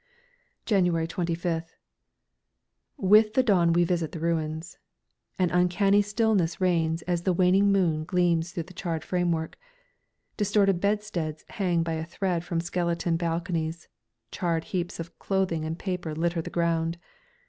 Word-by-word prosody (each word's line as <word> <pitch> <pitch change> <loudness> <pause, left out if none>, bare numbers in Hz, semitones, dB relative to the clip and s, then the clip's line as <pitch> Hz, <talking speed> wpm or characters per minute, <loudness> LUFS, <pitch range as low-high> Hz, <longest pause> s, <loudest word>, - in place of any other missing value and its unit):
January 180 -6 +2
25th. 165 -1 -3 1.2
With 215 -1 +5
the 260 - +4
dawn 180 -7 +3
we 175 +1 +4
visit 170 -2 -1
the 165 - -5
ruins. 160 0 -2 0.6
An 180 -2 +1
uncanny 180 +3 +3
stillness 205 -5 +1
reigns 165 -3 +1
as 175 -1 -1
the 185 +1 +1
waning 190 +3 +4
moon 165 -6 +1
gleams 175 -1 +1
through 170 - -4
the 180 +3 -15
charred 170 -3 -3
framework. 175 - -1 0.8
Distorted 200 -3 +2
bedsteads 200 -7 -2
hang 175 -5 0
by 165 0 -2
a 160 0 -2
thread 175 0 -2
from 170 -1 -2
skeleton 170 -1 -1
balconies, 165 -1 -2 0.4
charred 165 -2 -1
heaps 175 -1 -4
of 165 0 -8
clothing 185 -5 0
and 160 +1 -3
paper 180 -5 -4
litter 170 +1 0
the - - -7
ground. 165 -1 0
175 Hz, 135 wpm, -27 LUFS, 165-185 Hz, 1.2 s, With